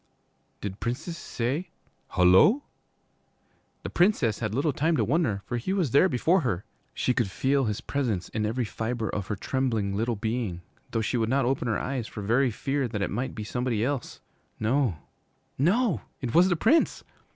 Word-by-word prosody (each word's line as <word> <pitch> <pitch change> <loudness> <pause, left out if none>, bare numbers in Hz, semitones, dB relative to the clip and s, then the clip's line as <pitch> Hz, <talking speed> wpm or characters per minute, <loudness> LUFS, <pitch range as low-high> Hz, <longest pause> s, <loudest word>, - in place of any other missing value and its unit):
Did 100 -1 -5
princes 125 +8 -3
say 135 +3 -3 0.5
'Hullo!' 95 - +6 1.2
The - - -5
Princess 165 - +2
had 110 -2 -2
little 140 +2 +1
time 160 +4 +1
to 115 - +2
wonder, 115 - 0
for 120 - -2
he 130 +11 -2
was 180 - 0
there 160 +8 +5
before 165 +9 +2
her. 105 - -2 0.3
She 125 - +1
could 120 -5 0
feel 135 +6 +1
his 105 -2 -2
presence 115 -11 -1
in 110 - -2
every 115 +3 0
fibre 110 0 -3
of 100 -1 -3
her 105 - -2
trembling 110 -4 -1
little 115 +3 0
being, 110 -4 -2 0.3
though 115 - -1
she 115 +3 0
would 110 -1 0
not 135 0 +2
open 125 -1 0
her 115 - +1
eyes 130 -4 -3
for 105 - -7
very 125 +6 +3
fear 135 +4 -1
that 105 -3 -3
it - - -2
might 125 +6 -3
be 110 - -4
somebody 120 0 -1
else. 140 -2 -3 0.4
No, 115 - +1 0.6
no, 195 - +2 0.2
it 125 -3 -4
was 180 +3 +6
the 175 - +2
Prince! 240 - +2
120 Hz, 180 wpm, -27 LUFS, 110-140 Hz, 1.2 s, Hullo